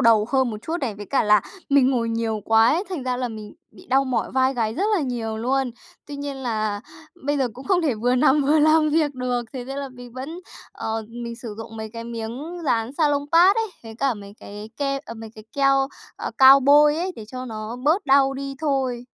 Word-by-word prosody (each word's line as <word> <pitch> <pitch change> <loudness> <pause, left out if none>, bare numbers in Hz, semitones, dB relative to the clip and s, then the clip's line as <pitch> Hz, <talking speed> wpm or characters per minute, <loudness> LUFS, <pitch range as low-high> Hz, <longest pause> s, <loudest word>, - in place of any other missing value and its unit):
đầu 225 -3 +5
hơn 260 -1 +2
một 215 - -5
chút 325 - -2
này, 235 -6 -2
với 205 0 -9
cả 275 - +1
là 210 0 +5 0.3
mình 275 -2 +4
ngồi 235 -3 0
nhiều 225 -1 -1
quá 225 +1 +5
ấy, 345 +6 +1
thành 360 -8 -4
ra 250 -1 -1
là 250 -1 -2
mình 215 -2 -9 0.2
bị 205 - -17
đau 270 +2 +3
mỏi 255 -2 -1
vai 260 0 +2
gáy 225 -2 -1
rất 380 - -1
là - - 0
nhiều 230 -4 -3
luôn. 260 +3 0 0.4
Tuy 290 -1 -7
nhiên 280 -1 -5
là 215 -5 -2 0.5
bây 290 0 +1
giờ 260 -3 +1
cũng 260 +4 -11
không 370 -3 +2
thể 290 -7 +1
vừa 245 +3 +1
nằm 265 +3 +4
vừa 295 +3 +3
làm 310 +1 +4
việc 300 -2 +1
được. 250 -1 -1
Thế 255 -2 -5
nên 270 +2 -6
là 280 - -4
mình 245 -2 -12
vẫn 280 +7 -7 0.3
ờ, 220 0 -4
mình 235 0 -7
sử 230 -3 -7
dụng 225 0 -8
mấy 220 0 -6
cái 230 0 -7
miếng 235 +9 -6
dán 230 -2 0
Salonpas 310 +5 +4
ấy, 450 -1 0
với 225 -1 -10
cả 265 +2 0
mấy 200 -1 -11
cái 210 +2 -9
ke 275 -1 -1
à, 230 - -8
mấy 225 -1 -9
cái 215 - -12
keo, 275 -1 +3 0.3
à, - - -4
cao 270 0 +9
bôi 295 +2 +5
ấy 360 +3 -2
để 220 - -8
cho 255 +1 -6
nó 220 -1 -6
bớt 315 +4 +2
đau 270 0 +4
đi 275 0 -5
thôi. 265 -5 -1
255 Hz, 235 wpm, -23 LUFS, 225-280 Hz, 0.5 s, cao